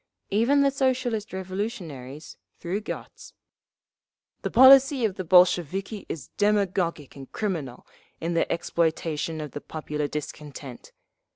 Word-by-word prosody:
Even 235 +8 +3
the 275 - +3
Socialist 255 -5 -1
Revolutionaries, 180 - -6 0.2
through 185 +4 -3
Gotz: 215 - -8 1.1
"The - - -2
policy 265 -1 +7
of 210 - 0
the 185 - -5
Bolsheviki 185 +3 +2
is 155 - -6
demagogic 190 -7 0
and 135 -1 -11
criminal, 165 - -4 0.3
in 165 +1 -2
their 165 - 0
exploitation 165 -2 -1
of 150 -1 -6
the 145 - -7
popular 150 -1 -4
discontent. 145 -3 -8
180 Hz, 115 wpm, -26 LUFS, 150-215 Hz, 1.1 s, policy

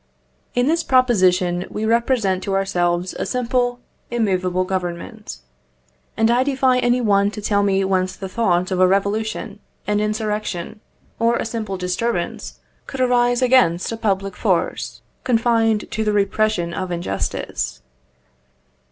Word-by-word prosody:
In 245 0 +2
this 330 +4 +2
proposition 185 - +2
we 215 - -3
represent 230 -4 +1
to 195 0 -2
ourselves 180 -2 0
a - - 0
simple, 245 0 -1 0.3
immovable 185 -6 0
Government. 185 +4 -5 0.8
And 225 +1 +3
I 245 +1 +3
defy 260 -2 +2
any 245 0 +2
one 200 -3 +3
to 210 - -7
tell 205 -1 +1
me 195 -1 +2
whence 185 -1 0
the 190 - -6
thought 185 -3 0
of 185 - 0
a 185 - +6
revolution, 200 +3 -1 0.3
an 210 0 +1
insurrection, 210 -2 -3 0.4
or 230 +1 +3
a - - -2
simple 215 -4 -4
disturbance 180 +1 -3 0.3
could 270 - -7
arise 245 0 +2
against 245 -10 +3
a - - -2
public 195 -3 -1
force - - -1 0.2
confined 225 -3 +2
to 220 - -1
the 210 -1 0
repression 200 -3 +1
of 185 0 -4
injustice. 170 - -3
210 Hz, 135 wpm, -21 LUFS, 185-235 Hz, 0.8 s, a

